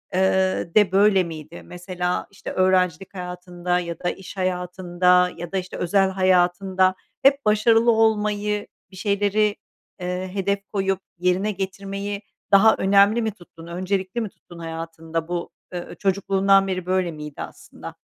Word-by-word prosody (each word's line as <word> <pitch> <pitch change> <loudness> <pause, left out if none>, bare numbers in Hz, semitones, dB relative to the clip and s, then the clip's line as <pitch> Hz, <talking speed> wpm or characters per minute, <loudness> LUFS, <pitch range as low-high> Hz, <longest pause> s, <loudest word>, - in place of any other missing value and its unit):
ııı, 190 -2 +1
de 210 -3 +5
böyle 195 -1 +4
miydi? 160 0 -8
Mesela, 180 0 -3
işte, 200 - -8
öğrencilik 185 -1 +1
hayatında 180 -1 -3
ya 170 -2 -5
da 175 - -1
iş 195 +1 -8
hayatında 180 0 +2
ya 175 0 -7
da, 195 - -1
işte, 185 -1 -5
özel 190 +2 +2
hayatında 185 0 +2 0.3
hep 275 -2 +4
başarılı 225 +2 +4
olmayı, 210 -2 +1 0.2
bir 190 - -13
şeyleri, 205 +1 +1 0.4
eee, 180 +1 -3
hedef 200 0 0
koyup 195 -1 0 0.2
yerine 180 +4 +1
getirmeyi 195 +1 -4 0.3
daha 205 +3 +7
önemli 200 +4 +4
mi 220 -1 -1
tuttun, 170 -4 -15
öncelikli 185 +5 -2
mi 215 - -3
tuttun 175 -2 -15
hayatında? 165 0 -5
Bu, 175 -1 -3 0.2
ııı, 175 - -6
çocukluğundan 195 0 +2
beri 185 -2 -3
böyle 185 -2 0
miydi 150 -2 -8
aslında? - - -10
185 Hz, 140 wpm, -23 LUFS, 180-200 Hz, 0.4 s, daha